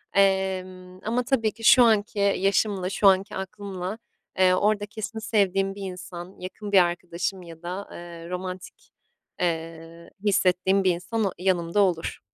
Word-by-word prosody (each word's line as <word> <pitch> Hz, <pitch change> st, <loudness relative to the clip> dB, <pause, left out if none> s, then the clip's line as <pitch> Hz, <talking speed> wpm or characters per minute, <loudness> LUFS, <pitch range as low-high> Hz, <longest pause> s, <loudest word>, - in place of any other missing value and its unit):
Emm, 185 Hz, -2 st, 0 dB
ama 235 Hz, +3 st, 0 dB
tabii 235 Hz, -4 st, +1 dB
ki 225 Hz, +2 st, -14 dB
şu 255 Hz, +2 st, +8 dB
anki 215 Hz, -2 st, +2 dB
yaşımla 200 Hz, -1 st, +1 dB
şu 200 Hz, +1 st, +3 dB
anki 190 Hz, +1 st, +3 dB
aklımla, 190 Hz, 0 st, -5 dB, 0.4 s
eee, 185 Hz, -1 st, +6 dB
orada 205 Hz, +2 st, +2 dB
kesin 220 Hz, +1 st, -6 dB
sevdiğim 195 Hz, -3 st, +1 dB
bir 200 Hz, -, -9 dB
insan, 180 Hz, 0 st, -9 dB
yakın 200 Hz, +3 st, -7 dB
bir 195 Hz, -, +7 dB
arkadaşım 175 Hz, +2 st, -3 dB
ya 165 Hz, -1 st, -12 dB
da, 185 Hz, +3 st, -5 dB
eee, 170 Hz, -1 st, -9 dB
romantik, 185 Hz, 0 st, -7 dB, 0.5 s
eee, 165 Hz, 0 st, -4 dB
hissettiğim 190 Hz, -1 st, +3 dB
bir 185 Hz, -, +4 dB
insan 215 Hz, +6 st, -2 dB
o 195 Hz, -, 0 dB
yanımda 180 Hz, 0 st, 0 dB
olur. 180 Hz, -4 st, 0 dB
190 Hz, 145 wpm, -25 LUFS, 180-205 Hz, 0.5 s, şu